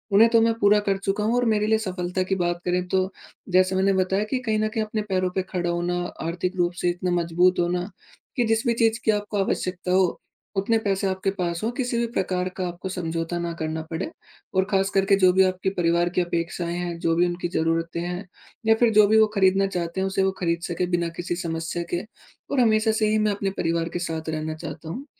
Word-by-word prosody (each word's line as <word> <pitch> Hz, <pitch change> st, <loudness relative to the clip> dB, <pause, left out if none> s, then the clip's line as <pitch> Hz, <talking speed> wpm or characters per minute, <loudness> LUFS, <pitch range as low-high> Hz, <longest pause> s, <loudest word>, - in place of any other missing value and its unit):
उन्हें 225 Hz, +3 st, +7 dB
तो 230 Hz, -1 st, +4 dB
मैं 230 Hz, 0 st, +3 dB
पूरा 205 Hz, +1 st, +5 dB
कर 195 Hz, -1 st, +2 dB
चुका 200 Hz, +2 st, 0 dB
हूँ 225 Hz, +3 st, +1 dB
और 245 Hz, 0 st, +2 dB
मेरे 210 Hz, 0 st, +1 dB
लिए 220 Hz, 0 st, +4 dB
सफ़लता 180 Hz, 0 st, -2 dB
की 190 Hz, +1 st, -1 dB
बात 175 Hz, 0 st, -1 dB
करें 180 Hz, 0 st, 0 dB
तो 190 Hz, +1 st, +1 dB, 0.4 s
जैसे 185 Hz, +1 st, +4 dB
मैंने 195 Hz, +1 st, +3 dB
बताया 190 Hz, +2 st, +1 dB
कि 260 Hz, -, +1 dB
कहीं 220 Hz, -4 st, -1 dB
न 215 Hz, -, +1 dB
कहीं 215 Hz, 0 st, -1 dB
अपने 215 Hz, 0 st, -2 dB
पैरों 185 Hz, -1 st, +1 dB
पे 190 Hz, -, +2 dB
खड़ा 175 Hz, -1 st, 0 dB
होना 175 Hz, +1 st, -1 dB, 0.3 s
आर्थिक 180 Hz, +2 st, -2 dB
रूप 175 Hz, 0 st, +1 dB
से 175 Hz, -, +2 dB
इतना 180 Hz, +1 st, -2 dB
मजबूत 175 Hz, +2 st, +2 dB
होना 175 Hz, +2 st, 0 dB, 0.5 s
कि 245 Hz, -, +2 dB
जिस 225 Hz, +1 st, +1 dB
भी 235 Hz, -, +4 dB
चीज़ 225 Hz, 0 st, +2 dB
की 220 Hz, -, +5 dB
आपको 205 Hz, 0 st, -2 dB
आवश्यकता 185 Hz, -1 st, -2 dB
हो 185 Hz, -1 st, +2 dB, 0.4 s
उतने 215 Hz, +4 st, +2 dB
पैसे 195 Hz, -2 st, 0 dB
आपके 190 Hz, +1 st, -1 dB
पास 170 Hz, -2 st, -2 dB
हो 225 Hz, -, +1 dB
किसी 245 Hz, -3 st, -1 dB
भी 235 Hz, -, +1 dB
प्रकार 185 Hz, -5 st, -1 dB
का 185 Hz, -1 st, -1 dB
आपको 175 Hz, +2 st, -6 dB
समझौता 165 Hz, -1 st, -3 dB
ना 170 Hz, 0 st, -2 dB
करना 160 Hz, 0 st, -2 dB
पड़े 165 Hz, +3 st, -3 dB, 0.5 s
और 190 Hz, 0 st, +3 dB
ख़ास 195 Hz, -1 st, +2 dB
करके 195 Hz, 0 st, +3 dB
जो 185 Hz, -, +7 dB
भी 190 Hz, +1 st, +5 dB
आपकी 185 Hz, 0 st, 0 dB
परिवार 170 Hz, 0 st, +2 dB
की -, -, +5 dB
अपेक्षाएँ 170 Hz, 0 st, -2 dB
हैं 175 Hz, -1 st, -3 dB
जो 165 Hz, 0 st, +1 dB
भी 175 Hz, +1 st, +4 dB
उनकी 175 Hz, 0 st, -3 dB
ज़रूरतें 165 Hz, +1 st, 0 dB
हैं 180 Hz, +2 st, -4 dB, 0.4 s
या 225 Hz, 0 st, +5 dB
फ़िर 235 Hz, +1 st, +3 dB
जो 210 Hz, -1 st, +7 dB
भी 220 Hz, +2 st, +4 dB
वो 220 Hz, -, +6 dB
ख़रीदना 195 Hz, 0 st, +4 dB
चाहते 175 Hz, -1 st, -3 dB
हैं 190 Hz, -, +1 dB
उसे 195 Hz, 0 st, 0 dB
वो 190 Hz, -, +2 dB
ख़रीद 170 Hz, -1 st, 0 dB
सके 175 Hz, +1 st, -1 dB
बिना 170 Hz, -1 st, 0 dB
किसी 175 Hz, 0 st, -2 dB
समस्या 165 Hz, 0 st, -3 dB
के 175 Hz, -, +1 dB, 0.5 s
और 280 Hz, -, +1 dB
हमेशा 220 Hz, -2 st, +4 dB
से 215 Hz, 0 st, +1 dB
ही 215 Hz, -, +2 dB
मैं -, -, +2 dB
अपने 200 Hz, -1 st, -1 dB
परिवार 165 Hz, 0 st, 0 dB
के 175 Hz, -, -2 dB
साथ 160 Hz, -2 st, -4 dB
रहना 155 Hz, 0 st, -3 dB
चाहता 160 Hz, 0 st, -8 dB
हूँ। 255 Hz, -, -6 dB
185 Hz, 235 wpm, -24 LUFS, 175-205 Hz, 0.5 s, उन्हें